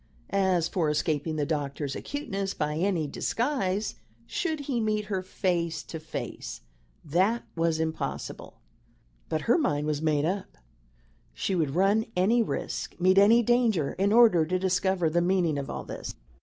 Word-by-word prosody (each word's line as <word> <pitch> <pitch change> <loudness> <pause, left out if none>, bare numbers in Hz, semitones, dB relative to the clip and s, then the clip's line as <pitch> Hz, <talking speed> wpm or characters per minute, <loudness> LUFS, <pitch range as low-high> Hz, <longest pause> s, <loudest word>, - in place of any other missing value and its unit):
As 190 -4 +2
for 165 -4 0
escaping 150 +1 0
the 150 -1 0
doctor's 145 -2 -2
acuteness 200 -10 -4
by 150 0 -1
any 175 -1 +1
disguise 210 - -1 0.3
should 315 -4 -2
he 270 -4 -2
meet 215 -1 0
her 190 - 0
face 175 -3 -1
to 160 - -7
face, 160 +1 -6 0.4
that 190 +10 +2
was 165 -1 +1
impossible. 160 0 -4 0.7
But 155 - -1
her 240 - +3
mind 150 - 0
was 150 -1 -1
made 155 -2 +1
up 190 +4 -3 0.8
she 190 - -1
would 155 -5 0
run 200 +4 +3
any 210 +7 +3
risk, 220 - -4
meet 185 +2 +5
any 225 +4 +6
danger, 225 - +2
in 195 +2 +1
order 220 -7 +6
to 180 +4 0
discover 185 -1 +1
the 170 +2 +2
meaning 175 -4 +1
of 140 - -5
all - - -4
this. - - -7
185 Hz, 155 wpm, -28 LUFS, 160-210 Hz, 0.8 s, any